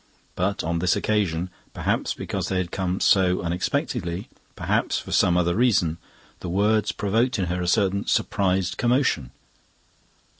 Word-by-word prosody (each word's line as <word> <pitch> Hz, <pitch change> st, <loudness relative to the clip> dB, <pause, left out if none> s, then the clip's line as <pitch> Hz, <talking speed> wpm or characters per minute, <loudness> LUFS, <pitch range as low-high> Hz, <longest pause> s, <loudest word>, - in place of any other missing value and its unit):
But 100 Hz, +3 st, -1 dB
on 85 Hz, +1 st, -1 dB
this 90 Hz, +1 st, +2 dB
occasion 90 Hz, -5 st, 0 dB, 0.2 s
perhaps -, -, -1 dB
because -, -, -3 dB
they 95 Hz, -, -1 dB
had 90 Hz, -1 st, -2 dB
come 95 Hz, -1 st, -2 dB
so 90 Hz, -2 st, +3 dB
unexpectedly, 85 Hz, 0 st, -2 dB, 0.3 s
perhaps -, -, 0 dB
for -, -, -7 dB
some 90 Hz, 0 st, +3 dB
other 85 Hz, -1 st, +2 dB
reason 100 Hz, -9 st, +2 dB, 0.4 s
the 90 Hz, -, -6 dB
words 105 Hz, +3 st, +2 dB
provoked 115 Hz, +5 st, 0 dB
in 95 Hz, -, 0 dB
her 90 Hz, +1 st, -2 dB
a 90 Hz, -, -2 dB
certain 100 Hz, +1 st, +1 dB
surprised 95 Hz, -3 st, +1 dB
commotion. 120 Hz, -, +1 dB
95 Hz, 145 wpm, -24 LUFS, 85-100 Hz, 0.4 s, so